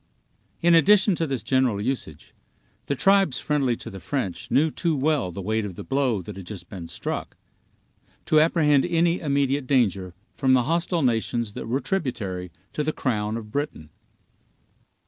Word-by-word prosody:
In 170 0 +5
addition 195 +5 +5
to 165 -1 -1
this 135 -5 -3
general 130 -6 +1
usage, 105 - -4 0.5
the 140 - 0
tribes 195 -5 +3
friendly 140 -5 +1
to 115 - -9
the 95 - -8
French 95 -1 -3
knew 150 +6 +3
too 165 0 0
well 140 -6 +1
the 95 +2 -7
weight 110 +3 0
of 100 -4 -6
the - - -7
blow 130 -8 0
that - - -8
had 95 -2 -9
just 90 -5 -8
been 90 -4 -7
struck, - - -5 0.9
to 155 - +4
apprehend 150 -3 +4
any 170 0 +2
immediate 140 -2 0
danger 100 -9 +1 0.2
from 130 -2 +2
the 125 -1 +4
hostile 170 +3 0
nations 115 -2 0
that - - -6
were 130 +5 0
tributary 105 - -3 0.2
to 150 - -1
the 155 - 0
crown 110 -6 -1
of 105 -2 -9
Britain. 140 - -4
130 Hz, 165 wpm, -24 LUFS, 105-155 Hz, 0.9 s, In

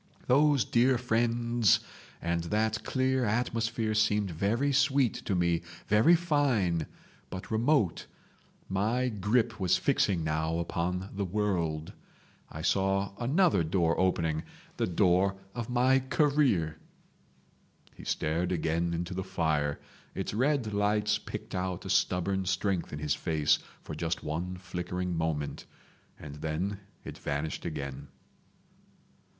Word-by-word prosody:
"Those 140 -2 +4
dear 125 +2 +3
friends 115 -2 +2 0.4
and 85 0 -1
that 110 +4 0
clear 130 0 +1
atmosphere 115 0 0
seemed 105 -2 +2
very 115 - 0
sweet 135 -2 +3
to 100 - 0
me, 85 -2 +1 0.2
very 110 +12 +5
fine, 135 - +1 0.4
but 95 +4 -7
remote. 110 - +1 0.6
My 110 +7 0
grip 110 +2 0
was 95 -2 +3
fixing 100 - +1
now 80 +1 -1
upon 90 +2 -2
the 100 0 -2
world. 90 -6 -1 0.6
I 80 - -7
saw 95 +2 +1
another 135 - +3
door 85 0 +1
opening—the 80 -4 -1
door 90 +2 +3 0.2
of 120 -1 -5
my 125 +2 +4
career." 130 - +1 1.1
He - - -13
stared 85 +4 -1
again 85 0 0
into 85 +2 -3
the 95 +1 -3
fire. 80 -6 0 0.4
Its - - -3
red 130 -2 +1
lights 105 +1 +1
picked - - -7
out 90 -1 -3
a - - -2
stubborn 95 +1 +1
strength 90 0 0
in 75 - -5
his 75 -1 0
face 80 -3 +1 0.2
for - - -7
just 80 +2 -2
one 85 +4 -3
flickering 90 0 -4
moment, 80 -3 -2 0.5
and 75 -1 -9
then 80 +6 -2 0.2
it - - -8
vanished 75 +1 -3
again. 70 -4 -5
95 Hz, 120 wpm, -30 LUFS, 85-115 Hz, 1.1 s, very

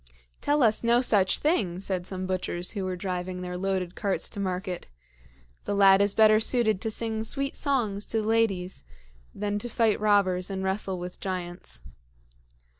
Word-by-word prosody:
"Tell 290 -1 +2
us 220 0 +3
no 235 +1 +4
such 205 -6 +3
thing!" 200 - 0
said 185 -2 -2
some 185 -1 -4
butchers 180 -1 -3
who 200 -3 -4
were 185 -1 -2
driving 180 0 -4
their 180 0 -5
loaded 185 -1 -2
carts 200 -2 -1
to - - -6
market. 185 -2 -4 0.8
"The 205 - -1
lad 195 0 +6
is 200 0 +3
better 215 -1 +6
suited 220 -3 +2
to 225 - -1
sing 220 0 -1
sweet 275 +5 -1
songs 225 -8 -1
to 220 -1 -1
the - - -4
ladies 200 - 0 0.5
than 205 0 -2
to 240 - -5
fight 225 -2 +1
robbers 200 -3 +2
and 190 -1 -4
wrestle 190 0 -2
with 180 0 -7
giants." 175 - -5
195 Hz, 170 wpm, -27 LUFS, 185-220 Hz, 0.8 s, lad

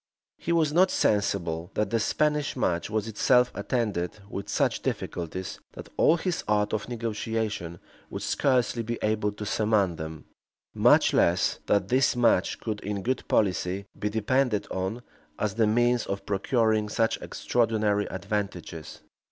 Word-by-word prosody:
He 170 - -3
was 160 -3 +2
not 185 +3 +5
sensible, 85 -5 0
that 105 -2 0
the 115 - +2
Spanish 150 +5 0
match 90 -9 0
was 110 0 -1
itself 125 +3 +3
attended 105 -9 -2
with 100 -1 -6
such - - +1
difficulties, 90 +2 -4
that - - -10
all 165 - +4
his 175 +1 -2
art 105 0 +1
of 110 +1 -2
negotiation 110 -6 -3 0.3
would - - -5
scarcely 125 -4 +1
be 115 +1 -3
able 105 -1 +1
to 105 0 -6
surmount 105 -5 +1
them; 80 -1 -7 0.5
much - - +4
less, 85 +2 +2
that 100 -2 +2
this 130 +1 +3
match 115 -6 +2
could 110 -2 -3
in 100 -1 -4
good 130 +1 -2
policy 95 -1 +1
be 105 - -1
depended 110 +1 +1
on, 95 +6 -3 0.3
as 105 -2 -1
the 110 0 +2
means 120 +2 +2
of 100 0 -4
procuring 110 +1 +1
such 115 +1 0
extraordinary 110 -3 0
advantages. 95 -4 -5
105 Hz, 145 wpm, -27 LUFS, 100-120 Hz, 0.5 s, not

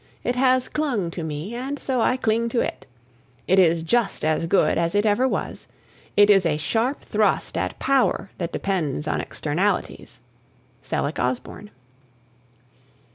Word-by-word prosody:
It 245 - -1
has 255 0 +3
clung 245 - -1
to 170 - -6
me 160 +7 -5
and 265 +4 -4
so 260 -3 -1
I 255 - +2
cling 230 -1 0
to 235 - 0
it. - - -3 0.6
It 190 +1 +4
is 165 -2 +3
just 225 0 0
as 155 +1 +1
good 175 -2 +2
as 170 +2 0
it 205 +1 +2
ever 215 +5 +3
was. - - -4 0.5
It 205 0 +7
is 195 -2 +5
a 160 -3 +1
sharp 230 - -1
thrust - - 0
at - - -2
power 265 -7 +1
that 170 -1 -3
depends 155 -6 -2
on - - 0
externalities. 175 - -2 0.6
Selleck 145 +2 -2
Osborne. 125 +11 -3
200 Hz, 150 wpm, -23 LUFS, 165-245 Hz, 0.6 s, It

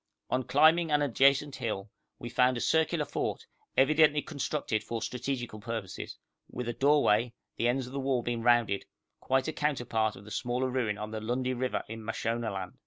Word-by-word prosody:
On 130 - +2
climbing 160 +5 +4
an 150 -1 +3
adjacent 140 +1 +3
hill 105 -5 -4 0.3
we 120 - -7
found 125 +1 +2
a - - -2
circular 160 +5 +2
fort, - - -3 0.3
evidently 150 +1 +5
constructed 140 -6 -2
for 115 +1 -4
strategical 125 -1 -4
purposes, 115 -3 -5 0.3
with 125 -1 -5
a 120 - -1
doorway, 125 -5 +3 0.2
the 120 - +1
ends 130 +1 +1
of 125 - -10
the 140 - -2
wall 130 -2 0
being 120 -1 -2
rounded, 115 -4 +3 0.3
quite 130 0 +1
a 160 - -2
counterpart 120 -8 0
of 100 - -13
the 105 - -11
smaller 125 +2 -1
ruin 115 -5 0
on 105 +1 -6
the 110 -1 -4
Lundi 125 +3 -1
river 125 0 -2
in 115 0 -7
Mashonaland. 110 -4 -3
125 Hz, 175 wpm, -30 LUFS, 115-135 Hz, 0.3 s, evidently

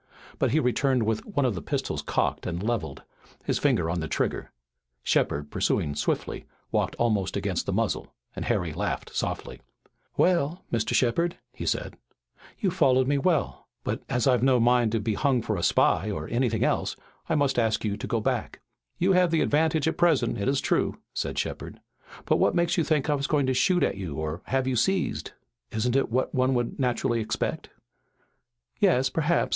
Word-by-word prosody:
But - - +2
he 150 +7 +2
returned 125 -1 +2
with 110 0 -1
one 145 -10 0
of 125 - +1
the 85 - -5
pistols - - -2
cocked - - -1
and 85 +2 -3
levelled, 115 0 -2 0.4
his - - 0
finger 80 - +2
on 85 +1 -1
the 80 - -3
trigger. - - -2 0.5
Shepard, 75 +1 0
pursuing 75 - 0
swiftly, 75 - -2 0.2
walked - - 0
almost 105 -5 0
against - - -2
the - - 0
muzzle, - - -1 0.2
and - - -4
Harry - - 0
laughed - - -3
softly. - - -3 0.6
"Well, 170 -2 +2
Mr. 110 -1 0
Shepard," 170 +8 +1 0.2
he - - -6
said, - - -2 0.6
"you've 190 -4 0
followed 130 -7 +3
me 140 0 +2
well, 160 -1 0 0.2
but - - -2
as 125 -1 0
I've 125 -4 +3
no 130 -1 +4
mind 120 -1 +3
to 115 - +2
be 110 +1 -1
hung 135 +3 +2
for 110 - -1
a 90 - -3
spy 95 +4 +3
or 80 -6 -4
anything 120 -2 0
else, - - 0 0.3
I 160 - +2
must 140 -4 +2
ask 115 -1 +1
you 100 -1 0
to 105 - -6
go 115 - 0
back." 105 - -2 0.4
"You 185 +2 +2
have 180 -1 +4
the 165 -1 +2
advantage 155 0 +2
at 160 - 0
present, 150 -9 +3
it 100 - -1
is 135 0 +2
true," - - 0 0.2
said - - -3
Shepard, - - -4 0.5
"but - - +3
what - - +2
makes 170 0 +2
you 170 - +2
think 150 -2 +1
I 150 - +2
was 140 -1 -1
going 145 -3 +2
to 130 - +1
shoot 180 +6 +3
at - - 0
you 90 -7 -5
or 80 +3 -4
have 135 0 0
you 130 -1 0
seized?" 185 +10 0 0.4
"Isn't 120 +3 -1
it 135 - +2
what 130 +3 0
one 130 0 +2
would 120 +2 -2
naturally 125 -2 +1
expect?" 110 - -3 1.1
"Yes 130 +2 +4
perhaps. 165 +4 +1
125 Hz, 190 wpm, -26 LUFS, 110-150 Hz, 1.1 s, no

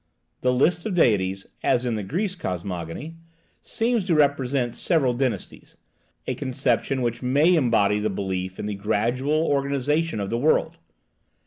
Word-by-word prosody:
The 125 - +2
list 160 +7 +2
of 200 - -2
deities 95 - +2 0.2
(as 125 - +1
in 120 - 0
the 110 - -2
Greek 185 - -3
cosmogony) 90 - -5 0.4
seems 230 -1 0
to 175 -4 +2
represent 135 -4 +1
several 140 -8 +1
dynasties, 125 -1 -4 0.5
a - - -1
conception 130 0 0
which 120 -1 -2
may 145 +7 +3
embody 115 - +3
the 110 +1 0
belief 95 -1 -3
in - - -5
the 105 - -2
gradual 120 +10 0
organization 140 0 0
of 100 -1 -3
the 115 - 0
world. 150 +5 +1
125 Hz, 145 wpm, -24 LUFS, 105-150 Hz, 0.5 s, may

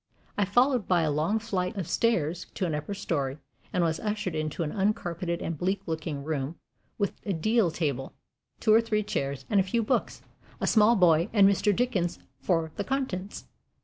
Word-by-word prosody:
I 205 - +2
followed 245 +3 +2
by 175 -3 +3
a 155 - +1
long 155 +9 +1
flight 195 -4 -2
of 185 -5 -3
stairs 175 -8 0
to 190 - -1
an 165 - -1
upper 150 +7 -3
story, 140 -8 -2 0.3
and 180 - +1
was 160 -1 0
ushered 210 -4 -2
into 155 +2 -2
an 150 - -3
uncarpeted 185 -4 -1
and 165 - -2
bleak 190 +5 -1
looking 155 -3 -4
room, 150 0 -3 0.4
with 200 -2 0
a 200 - -1
deal 215 +4 +2
table, 145 -5 -2 0.5
two 215 - +4
or 225 - +7
three 215 -2 0
chairs 140 -9 -3
and 205 - +3
a - - +4
few 225 +5 0
books, 250 +4 -1 0.4
a - - -1
small 220 +1 +5
boy 170 -1 +4
and 200 -3 +6
Mr. 200 +1 +3
Dickens 200 -6 0 0.2
for 165 -3 0
the 205 - -1
contents. 210 -7 -3
185 Hz, 185 wpm, -28 LUFS, 160-210 Hz, 0.5 s, or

